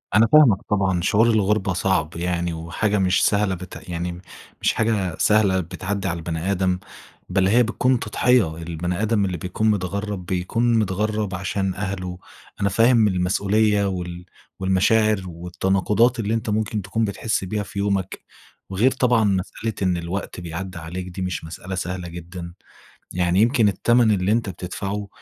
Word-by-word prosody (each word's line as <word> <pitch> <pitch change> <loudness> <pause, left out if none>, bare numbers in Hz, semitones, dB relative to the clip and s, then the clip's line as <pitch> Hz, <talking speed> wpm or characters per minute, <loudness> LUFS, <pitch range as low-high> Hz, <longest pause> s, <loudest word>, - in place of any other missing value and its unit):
أنا 110 +2 +6
فاهمك 120 -7 +6
طبعًا، 95 -4 +1
شعور 110 +5 +3
الغربة 105 -2 +2
صعب 90 -4 0
يعني، 85 0 -1
وحاجة 85 +6 -1
مش 95 -1 +3
سهلة 100 -2 +2
بت 90 0 -10
يعني 85 +1 -4 0.4
مش - - +2
حاجة 105 -7 0
سهلة 100 -3 +3
بتعدي 95 +3 -4
على 90 -2 -2
البني 85 +3 -3
آدم، 90 -1 0 0.5
بل 95 -1 +2
هي 120 +5 +5
بتكون 125 +2 +1
تضحية. 110 -7 +2
البني 85 +2 -3
آدم 110 -2 +2
اللي 90 -2 -2
بيكون 95 +6 -1
متغرب 100 -1 -2
بيكون 105 +7 0
متغرب 105 0 -1
عشان 95 +1 -2
أهله. 95 -2 -4 0.4
أنا 100 - +2
فاهم 115 +2 +4
المسؤوليّة 100 +3 +2
وال 90 -1 -5 0.3
والمشاعر 100 +2 +3
والتناقضات 95 +7 +1
اللي 110 0 -1
أنت 115 -1 -2
ممكن 105 0 -1
تكون 110 +4 -1
بتحس 105 +1 -2
بيها 105 +3 -2
في 100 - -7
يومك، 100 -2 -1 0.5
وغير 105 +8 +2
طبعًا 125 -3 +2
مسألة 100 +3 -1
إن 90 -2 +1
الوقت 90 +2 -5
بيعدى 90 +2 -6
عليك، 90 +2 -6
دي 90 +1 -7
مش 90 -3 -3
مسألة 90 +4 -7
سهلة 90 -1 -4
جدًا. 85 0 -8 0.6
يعني 90 +2 +2
يمكن 115 -1 +4
التمن 115 +4 +3
اللي 95 -1 +1
أنت 115 -2 +1
بتدفعه 95 +3 -5
95 Hz, 150 wpm, -22 LUFS, 90-105 Hz, 0.6 s, أنا